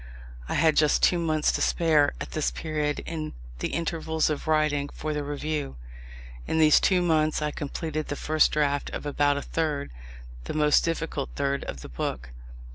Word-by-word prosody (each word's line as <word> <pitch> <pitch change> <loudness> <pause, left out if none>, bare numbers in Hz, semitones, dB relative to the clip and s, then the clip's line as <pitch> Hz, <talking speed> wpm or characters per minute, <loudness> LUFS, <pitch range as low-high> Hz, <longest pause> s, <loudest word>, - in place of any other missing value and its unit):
I - - -1
had 155 0 +3
just 150 -1 +3
two 175 - +4
months 155 -2 +1
to - - -2
spare, 155 -4 +3
at - - -6
this 155 - 0
period, 150 -2 -2
in 155 -2 -5 0.3
the - - -1
intervals 160 -1 -1
of 150 - -4
writing 150 -2 +1
for 155 +1 -4
the 150 -1 -2
Review. 145 - -3 0.7
In - - 0
these 155 -1 +6
two 180 -2 +3
months 155 -2 +2
I 150 -1 -1
completed 155 +2 -4
the 145 - -3
first 155 +2 +2
draft 145 -1 0
of - - -5
about 145 0 +2
a 140 - -3
third, 150 -3 -2 0.5
the - - -5
most 150 -1 +4
difficult 165 -4 -2
third, 140 0 -1
of 65 - -6
the - - -9
book. - - -4
155 Hz, 180 wpm, -26 LUFS, 145-160 Hz, 0.7 s, these